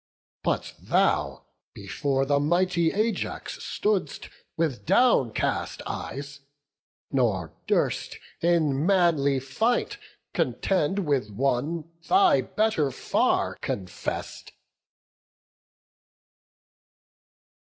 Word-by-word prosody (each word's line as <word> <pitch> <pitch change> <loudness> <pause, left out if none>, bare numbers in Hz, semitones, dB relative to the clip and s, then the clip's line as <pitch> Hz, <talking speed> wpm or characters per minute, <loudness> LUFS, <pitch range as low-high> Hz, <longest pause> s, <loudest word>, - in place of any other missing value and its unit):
But - - -1
thou - - +1 0.3
before 135 -1 -1
the 140 +1 +2
mighty 170 +2 +2
Ajax 215 +2 -2
stood'st 210 -3 -1 0.3
With 160 -7 -1
downcast 185 - +2
eyes, 140 +1 -6 0.7
nor 100 - 0
durst - - 0 0.2
in 155 -5 +2
manly 165 -7 +3
fight 220 - -1 0.3
Contend 190 +1 0
with 135 -8 0
one 140 +8 -1 0.2
thy 370 -5 +5
better 215 -10 0
far 130 - 0
confess'd." 95 -2 -5
150 Hz, 75 wpm, -26 LUFS, 135-185 Hz, 0.7 s, thy